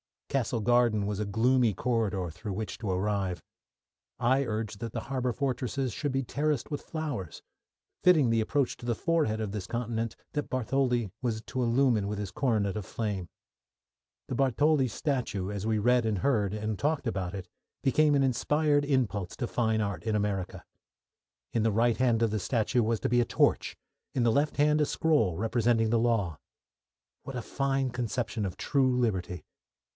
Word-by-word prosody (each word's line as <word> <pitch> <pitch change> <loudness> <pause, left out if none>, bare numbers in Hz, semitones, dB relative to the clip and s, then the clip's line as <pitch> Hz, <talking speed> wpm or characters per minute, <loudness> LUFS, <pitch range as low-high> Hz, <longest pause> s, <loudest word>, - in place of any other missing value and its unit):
Castle 120 -4 0
Garden 120 -3 +3
was 105 -1 -2
a 105 - -1
gloomy 115 +2 +3
corridor 100 -6 -1
through 95 +5 -6
which 105 0 -4
to 110 -5 -3
arrive. 95 -1 -1 0.7
I 130 +3 +2
urged 110 -2 -3
that 115 -1 -5
the - - -3
harbour 130 -2 0
fortresses 130 0 -1
should 145 +2 -2
be 135 0 0
terraced 145 +2 -1
with 145 - -3
flowers, 145 - -5 0.6
fitting 160 -9 +5
the 115 0 +2
approach 135 +3 0
to - - -10
the 120 -1 0
forehead 150 -8 0
of 105 -2 -3
this 100 -3 -5
continent 115 -1 -2 0.2
that 145 - -3
Bartholdi 125 -4 0
was 115 -3 -1
to 130 - -2
illumine 120 -3 +2
with 105 0 -3
his 100 -2 -4
Coronet 110 -6 0
of 105 - -4
Flame. 100 -5 -3 1.0
The - - -4
Bartholdi 135 +2 +3
statue, 115 - -2
as 100 +1 -3
we 110 -1 +2
read 120 +2 +3
and 105 -3 0
heard, 105 -5 +1
and 105 -1 -3
talked 150 -1 0
about 95 -5 -2
it, 95 -2 -6 0.4
became 145 +2 +4
an 140 - +3
inspired 145 +3 +2
impulse 105 -10 0
to 120 - -3
fine 110 -3 +1
art 100 -6 -2
in 110 - 0
America. 100 -3 -2 0.9
In 115 - +1
the 110 -2 +2
right 115 +2 +2
hand 120 -3 +2
of 115 - +2
the 110 - 0
statue 120 +3 +1
was 115 -1 0
to - - 0
be 120 +1 +3
a 120 - +3
torch; - - +1 0.4
in 125 - +2
the 115 - +4
left 145 +6 +1
hand, 150 +1 +4
a - - +4
scroll 145 - +2
representing 115 +1 +2
the 115 - +3
law. 110 -9 0 0.8
What 135 - -7
a 125 - -2
fine 135 0 -1
conception 120 -2 -2
of 95 -2 -5
true 130 -3 +2
liberty! 95 -8 -1
115 Hz, 180 wpm, -29 LUFS, 105-130 Hz, 1.0 s, fitting